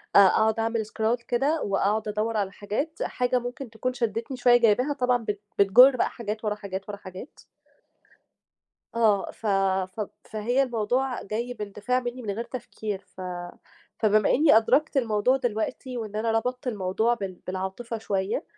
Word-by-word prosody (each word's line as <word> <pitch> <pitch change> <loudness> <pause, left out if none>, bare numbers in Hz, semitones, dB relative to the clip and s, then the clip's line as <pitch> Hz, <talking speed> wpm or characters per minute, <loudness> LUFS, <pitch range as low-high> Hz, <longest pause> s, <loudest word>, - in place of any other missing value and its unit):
أ - - +10
أقعُد 220 +3 +5
أعمل 225 0 0
Scroll 225 +3 -1
كده 280 +6 +1
وأقعُد 205 +2 0
أدوَّر 215 +1 -1
على 195 -2 -1
حاجات، 215 +11 -3
حاجة 250 0 0
ممكن 245 +2 -6
تكون 230 +3 -3
شدّتني 235 +1 -2
شوية 245 0 +6
جايباها 245 +5 +3
طبعًا 250 -3 +2
بت 205 -2 -3 0.2
بتجُر 245 +7 +7
بقى 245 - +1
حاجات، 220 -1 -5
ورا 210 -1 0
حاجات، 200 -1 -6
ورا 205 - -5
حاجات. 190 +6 -11 1.5
آه. 215 -4 +2
ف - - -14 0.5
ف 220 - -3 0.2
فهي 240 +5 0
الموضوع 245 +2 -1
جاي 235 +5 -3
باندفاع 210 +3 -2
منّي 245 +1 -5
من 215 -4 -3
غير 220 +4 -3
تفكير، 225 -4 -6
ف 185 - -8 0.8
فبما 215 -1 +3
إنّي 290 -4 +6
أدركت 280 +6 +2
الموضوع 235 +2 +2
دلوقتي 245 +2 -3
وإن 215 -2 -5
أنا 225 +1 0
ربطت 250 +4 -1
الموضوع 215 +1 +1
بال 195 -5 -4
بالعاطفة 190 +5 -4
شوية 200 - -2
225 Hz, 155 wpm, -26 LUFS, 210-250 Hz, 1.5 s, أ